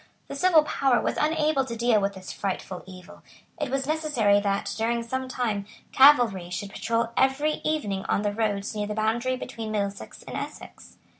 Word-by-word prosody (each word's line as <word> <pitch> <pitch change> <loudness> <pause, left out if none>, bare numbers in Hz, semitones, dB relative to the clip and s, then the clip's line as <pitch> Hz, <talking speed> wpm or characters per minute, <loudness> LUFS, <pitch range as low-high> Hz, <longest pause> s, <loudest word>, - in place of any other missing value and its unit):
The - - -5
civil 330 0 +5
power 270 -4 +2
was - - -1
unable 305 -2 +2
to 235 -3 -6
deal 230 -2 +2
with 200 0 -1
this 185 -1 -8
frightful 190 -1 -4
evil. 185 0 -12 0.4
It 295 -3 -2
was 270 +1 -1
necessary 285 -10 +2
that, 200 -1 -1
during 235 +1 0
some 260 +3 -3
time, 220 -6 -2 0.2
cavalry 240 -10 +5
should 195 +2 -5
patrol 230 +2 -1
every 270 +4 +1
evening 210 -12 -1
on 205 - +1
the 205 -1 0
roads 210 -1 -1
near 210 -1 -2
the 210 - -4
boundary 230 +4 0
between 225 -3 -6
Middlesex 200 -2 -4
and - - -8
Essex. - - -8
230 Hz, 175 wpm, -26 LUFS, 200-270 Hz, 0.4 s, civil